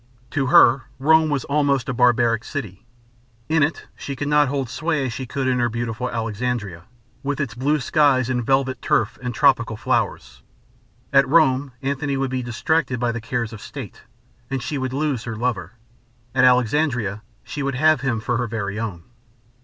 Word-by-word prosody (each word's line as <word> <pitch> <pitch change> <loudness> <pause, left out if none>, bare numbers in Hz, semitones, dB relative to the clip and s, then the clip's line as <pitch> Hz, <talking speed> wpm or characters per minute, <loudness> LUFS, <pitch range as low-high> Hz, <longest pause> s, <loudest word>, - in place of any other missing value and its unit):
To 140 -3 0
her 130 +1 +6
Rome 160 +3 +4
was 145 -3 -1
almost 140 -2 +1
a 135 - -1
barbarian 120 -2 +3
city. 115 - -7 0.6
In 160 0 +3
it 145 +3 0
she 140 - -6
could 145 +2 -3
not 150 -1 +4
hold 135 -1 -2
sway 155 +2 -1
as 120 - -3
she 130 +1 -5
could 135 +1 -2
in 125 -1 +1
her 120 0 +2
beautiful 120 +1 -3
Alexandria, 110 -5 -3 0.4
with 140 0 -3
its 135 -7 -2
blue 140 +6 0
skies 135 -3 +3
and 125 -1 -1
velvet 130 0 +1
turf 110 - 0
and 125 0 -3
tropical 115 -4 +2
flowers. 60 - -2 0.7
At 135 -1 +5
Rome 140 -4 +3
Antony 140 0 -1
would 135 -1 -1
be 130 -1 -1
distracted 125 +2 -1
by 120 -1 0
the 115 -1 -5
cares 115 0 -3
of 110 - -9
state, - - -9 0.5
and 135 -2 -3
she 140 +1 -3
would 130 -1 -2
lose 140 -3 -1
her 115 -2 -4
lover. 110 -4 -2 0.6
At 130 -1 +4
Alexandria 125 -4 +2 0.2
she 145 - -6
would 140 -1 -1
have 155 +1 +3
him 125 -5 0
for 120 +2 -1
her 120 0 -1
very 105 -2 -4
own. 100 -7 -5
130 Hz, 180 wpm, -22 LUFS, 115-140 Hz, 0.7 s, her